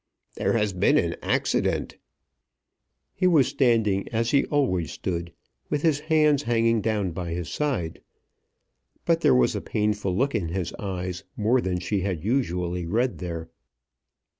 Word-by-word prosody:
"There -, -, 0 dB
has 105 Hz, -3 st, +1 dB
been 90 Hz, -, +3 dB
an -, -, +1 dB
accident." -, -, 0 dB, 1.2 s
He 185 Hz, -, +1 dB
was 155 Hz, -7 st, +5 dB
standing, 110 Hz, -7 st, +2 dB
as 115 Hz, 0 st, 0 dB
he 140 Hz, -, +3 dB
always 95 Hz, -, 0 dB
stood, 85 Hz, -2 st, -4 dB, 0.4 s
with 150 Hz, -, -1 dB
his 155 Hz, -4 st, +3 dB
hands 150 Hz, -2 st, +3 dB
hanging 115 Hz, -3 st, +2 dB
down 105 Hz, -4 st, 0 dB
by 85 Hz, -1 st, -4 dB
his 85 Hz, -1 st, -4 dB
side. 130 Hz, -, -2 dB, 1.0 s
But -, -, +2 dB
there 65 Hz, -, +5 dB
was 65 Hz, -1 st, +3 dB
a -, -, -2 dB
painful 105 Hz, -3 st, -1 dB
look 135 Hz, +4 st, +1 dB
in 100 Hz, -7 st, -1 dB
his 85 Hz, 0 st, -3 dB
eyes 90 Hz, -2 st, -4 dB
more 115 Hz, +4 st, +2 dB
than 90 Hz, -3 st, -1 dB
she 95 Hz, +3 st, -1 dB
had 90 Hz, -4 st, -2 dB
usually 90 Hz, -7 st, -1 dB
read 120 Hz, +7 st, 0 dB
there. 85 Hz, -2 st, -5 dB
105 Hz, 150 wpm, -25 LUFS, 90-125 Hz, 1.2 s, was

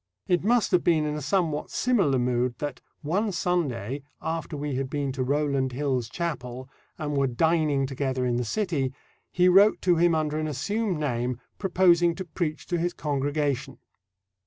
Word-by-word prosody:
It 175 Hz, -1 st, +2 dB
must 235 Hz, +2 st, +2 dB
have 180 Hz, -2 st, +3 dB
been 160 Hz, -3 st, +3 dB
in 150 Hz, -, -1 dB
a 150 Hz, -, -4 dB
somewhat 155 Hz, 0 st, 0 dB
similar 195 Hz, -, +2 dB
mood 125 Hz, 0 st, 0 dB
that 145 Hz, -4 st, -5 dB, 0.2 s
"one 200 Hz, +8 st, 0 dB
Sunday 145 Hz, -, -1 dB, 0.2 s
after 160 Hz, -1 st, -4 dB
we 145 Hz, 0 st, -3 dB
had 130 Hz, 0 st, -2 dB
been 140 Hz, -1 st, -2 dB
to 130 Hz, 0 st, -4 dB
Rowland 140 Hz, -1 st, 0 dB
Hill's 130 Hz, -4 st, -1 dB
chapel, 130 Hz, -5 st, -4 dB, 0.3 s
and 150 Hz, -1 st, -3 dB
were 140 Hz, -1 st, +2 dB
dining 150 Hz, +1 st, +2 dB
together 130 Hz, -1 st, -2 dB
in 120 Hz, -1 st, +1 dB
the 125 Hz, -, 0 dB
city, 140 Hz, -, -1 dB, 0.4 s
he 180 Hz, 0 st, +3 dB
wrote 195 Hz, +4 st, +6 dB
to 180 Hz, -2 st, +4 dB
him 170 Hz, 0 st, +4 dB
under 155 Hz, -1 st, 0 dB
an 155 Hz, -, -1 dB
assumed 185 Hz, -, -1 dB
name, 125 Hz, -4 st, -2 dB, 0.2 s
proposing 175 Hz, -3 st, +3 dB
to 190 Hz, -, -5 dB
preach 155 Hz, -2 st, -3 dB
to 175 Hz, -1 st, 0 dB
his 175 Hz, +1 st, -1 dB
congregation." 145 Hz, -1 st, -1 dB
150 Hz, 170 wpm, -26 LUFS, 135-175 Hz, 0.4 s, wrote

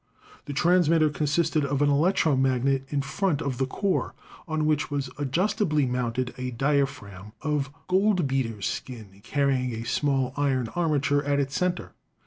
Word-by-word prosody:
The 145 Hz, -, -5 dB
transmitter 165 Hz, 0 st, +3 dB
consisted 155 Hz, +1 st, +1 dB
of 140 Hz, 0 st, -1 dB
an 145 Hz, -, +3 dB
electromagnet 135 Hz, -4 st, +2 dB
in 140 Hz, -2 st, -1 dB
front 175 Hz, +1 st, -1 dB
of 135 Hz, -5 st, -3 dB
the 130 Hz, -, +1 dB
core, 195 Hz, +7 st, -1 dB, 0.3 s
on 155 Hz, -1 st, -1 dB
which 155 Hz, -1 st, +1 dB
was 140 Hz, -3 st, -3 dB
adjustably 155 Hz, +1 st, +1 dB
mounted 125 Hz, 0 st, -2 dB
a 130 Hz, 0 st, -3 dB
diaphragm 125 Hz, -7 st, -2 dB
of 150 Hz, -3 st, 0 dB, 0.2 s
goldbeater's 140 Hz, -, +1 dB
skin 105 Hz, -6 st, -6 dB
carrying 130 Hz, -1 st, 0 dB
a 115 Hz, -, -5 dB
small 135 Hz, +1 st, 0 dB
iron 135 Hz, -5 st, 0 dB
armature 145 Hz, -3 st, +1 dB
at 145 Hz, 0 st, +1 dB
its 135 Hz, -1 st, -2 dB
center. 180 Hz, -1 st, -1 dB
140 Hz, 140 wpm, -26 LUFS, 130-155 Hz, 0.3 s, transmitter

